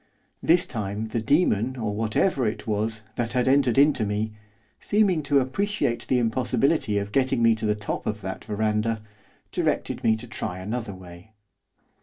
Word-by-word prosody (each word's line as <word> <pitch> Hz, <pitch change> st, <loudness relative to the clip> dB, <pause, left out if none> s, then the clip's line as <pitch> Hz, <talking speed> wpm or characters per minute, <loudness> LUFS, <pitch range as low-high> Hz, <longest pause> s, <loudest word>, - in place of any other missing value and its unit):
This 175 Hz, +2 st, +4 dB
time 105 Hz, 0 st, -4 dB
the 115 Hz, +1 st, -1 dB
demon, 130 Hz, -, +2 dB
or 110 Hz, -3 st, -2 dB
whatever 115 Hz, -, +1 dB
it 105 Hz, 0 st, -4 dB
was, 110 Hz, 0 st, -2 dB
that 120 Hz, -1 st, -1 dB
had 125 Hz, -1 st, +1 dB
entered 135 Hz, -3 st, +3 dB
into 140 Hz, -4 st, +4 dB
me, 105 Hz, +1 st, -1 dB, 0.5 s
seeming 200 Hz, -6 st, +2 dB
to 145 Hz, -1 st, +2 dB
appreciate 135 Hz, -, -1 dB
the 130 Hz, -, +2 dB
impossibility 125 Hz, +1 st, +1 dB
of 100 Hz, 0 st, -2 dB
getting 130 Hz, -1 st, +2 dB
me 115 Hz, 0 st, +6 dB
to 110 Hz, -1 st, -2 dB
the 105 Hz, -, +2 dB
top 105 Hz, 0 st, -4 dB
of 105 Hz, 0 st, -2 dB
that 95 Hz, 0 st, -5 dB
verandah, 110 Hz, +1 st, -1 dB, 0.5 s
directed -, -, -1 dB
me 110 Hz, -1 st, +4 dB
to 110 Hz, +2 st, -8 dB
try 105 Hz, -5 st, -4 dB
another 105 Hz, +2 st, -4 dB
way. 90 Hz, +3 st, -13 dB
110 Hz, 165 wpm, -25 LUFS, 105-130 Hz, 0.5 s, me